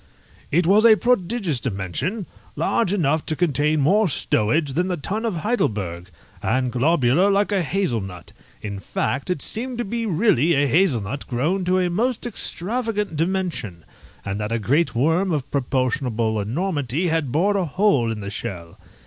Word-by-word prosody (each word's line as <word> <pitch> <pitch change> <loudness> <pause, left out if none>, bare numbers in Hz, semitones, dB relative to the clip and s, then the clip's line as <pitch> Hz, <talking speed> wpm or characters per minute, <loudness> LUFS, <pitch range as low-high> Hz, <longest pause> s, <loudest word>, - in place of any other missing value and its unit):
It 170 +4 +2
was 200 +5 +5
a 225 -2 +8
prodigious 210 - +1
dimension, 125 - -2 0.3
large 225 -6 +1
enough 160 -6 +1
to 155 - 0
contain 150 -2 +1
more 200 +9 +3
stowage 140 +3 +1
than 180 +5 0
the 180 -2 -2
tun 210 +9 -3
of 220 -5 -1
Heidelberg, 100 - -2 0.3
and 130 -1 0
globular 140 - +3
like 200 +1 +2
a 200 -2 +2
hazel 170 - -1
nut: 90 -3 -9 0.3
in 100 -2 -5
fact, 135 - -3
it 180 -6 0
seemed 245 +2 -1
to 240 - -2
be 230 +3 -3
really 170 - +3
a 140 +1 +3
hazel 145 - +2
nut 125 +9 -6
grown 155 +10 0
to 185 +1 +2
a 180 -1 +1
most 240 +7 0
extravagant 215 -2 -2
dimension, 155 - -2 0.4
and 100 +1 -3
that 105 +1 -3
a 115 - +1
great 130 +7 +1
worm 165 +9 +2
of 145 -5 -2
proportionable 125 -4 0
enormity 145 - -1
had 160 -5 -1
bored 195 +8 +2
a 190 -3 +1
hole 150 - +2
in 110 -1 -5
the 100 0 -5
shell. 90 -6 -6
160 Hz, 165 wpm, -22 LUFS, 120-195 Hz, 0.4 s, a